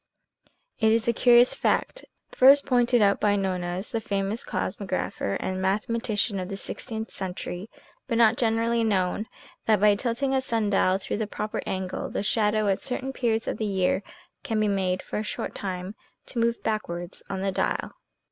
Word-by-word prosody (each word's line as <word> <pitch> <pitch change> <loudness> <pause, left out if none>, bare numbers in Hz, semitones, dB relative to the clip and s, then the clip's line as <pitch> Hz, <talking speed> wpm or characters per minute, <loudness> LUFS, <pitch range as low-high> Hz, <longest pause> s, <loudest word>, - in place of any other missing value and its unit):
It 220 -1 +4
is 225 0 +1
a 235 - +3
curious 245 +1 +6
fact, - - -1 0.3
first 275 +2 +6
pointed 245 -3 +3
out 200 0 +3
by 205 -1 +3
Nonez, 185 -1 -2
the 225 - -1
famous 200 +1 -2
cosmographer 185 - -2
and 185 0 -3
mathematician 210 +1 0
of 185 0 -5
the 195 - -4
sixteenth 220 +2 -6
century, 185 +1 -5 0.4
but 230 -3 0
not 230 -1 +5
generally 230 0 +1
known, 205 0 0 0.4
that 215 -2 +4
by 210 +1 +5
tilting 245 +5 -1
a 265 - +2
sun 225 -5 0
dial 190 -1 +3
through 195 - -4
the 215 -1 -2
proper 210 0 -4
angle, 185 -1 -3
the - - -3
shadow 210 0 +2
at 195 -1 +2
certain 265 +1 -3
periods 225 -4 0
of - - -3
the 220 - 0
year 190 -1 +1 0.4
can 220 -1 -1
be 215 - +2
made, 190 -2 0
for - - -4
a - - -2
short - - -4
time, 185 0 -5 0.3
to 240 - -4
move 235 0 0
backwards 175 -5 -3
on 190 -1 -3
the 195 - +1
dial. - - -1
210 Hz, 175 wpm, -26 LUFS, 190-230 Hz, 0.4 s, curious